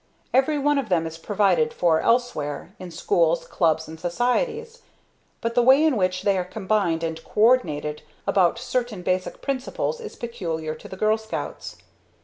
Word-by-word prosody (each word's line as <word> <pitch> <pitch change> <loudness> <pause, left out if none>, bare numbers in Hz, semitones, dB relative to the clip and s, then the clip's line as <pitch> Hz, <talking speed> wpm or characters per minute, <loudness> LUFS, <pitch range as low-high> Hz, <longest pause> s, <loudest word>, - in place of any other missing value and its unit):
Every 270 +4 +3
one 290 0 +2
of 250 -6 -4
them 170 -3 +2
is 165 0 -7
provided 185 -5 +1
for 165 -3 +3
elsewhere, 195 - 0
in 185 -1 -8
schools, 165 0 +1
clubs, 160 -1 +1
and 160 0 -10
societies. 450 - -1 0.6
But 230 0 -1
the 245 - +4
way 265 +5 +6
in 310 -4 +3
which 185 -2 0
they 195 -2 +2
are - - 0
combined 190 -3 -1
and 160 0 -4
co - - -7
ordinated 150 -11 +2 0.2
about 185 +2 +3
certain 240 -5 -3
basic 185 +1 -2
principles 275 - -2
is 455 - -8
peculiar 170 -10 -4
to - - -11
the 190 - -9
Girl 215 +2 +2
Scouts. 220 0 -6
195 Hz, 165 wpm, -24 LUFS, 165-245 Hz, 0.6 s, way